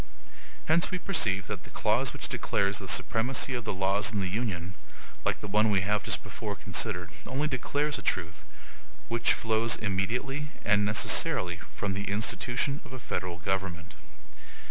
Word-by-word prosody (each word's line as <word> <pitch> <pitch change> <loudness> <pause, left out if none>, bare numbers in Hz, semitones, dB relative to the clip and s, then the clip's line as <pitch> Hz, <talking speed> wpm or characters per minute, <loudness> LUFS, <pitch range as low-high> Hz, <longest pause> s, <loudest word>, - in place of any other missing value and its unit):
Hence 165 +2 +4
we 185 - -1
perceive 100 - +1
that 100 -2 -5
the - - -11
clause 110 +5 +2
which - - -5
declares 100 -1 0
the - - -7
supremacy 130 +3 +1
of 120 -3 -3
the - - -1
laws 100 +2 +1
of 105 - -1
the 95 - 0
Union, 95 -4 -2 0.5
like - - 0
the 105 - -5
one 105 +2 +3
we 100 -2 +3
have 105 +2 +1
just - - -1
before - - -5
considered, 90 0 -1 0.2
only 140 +4 0
declares 145 +2 0
a - - -7
truth, 85 -2 -1 0.7
which 115 0 +3
flows 115 0 +2
immediately 125 +9 -1 0.2
and 105 -1 +4
necessarily 90 -4 +3 0.2
from 100 -2 -1
the 100 +1 -3
institution 115 +7 0
of - - -12
a 130 - -6
federal 90 -6 -3
government. 90 -2 -2
105 Hz, 165 wpm, -29 LUFS, 95-125 Hz, 0.7 s, Hence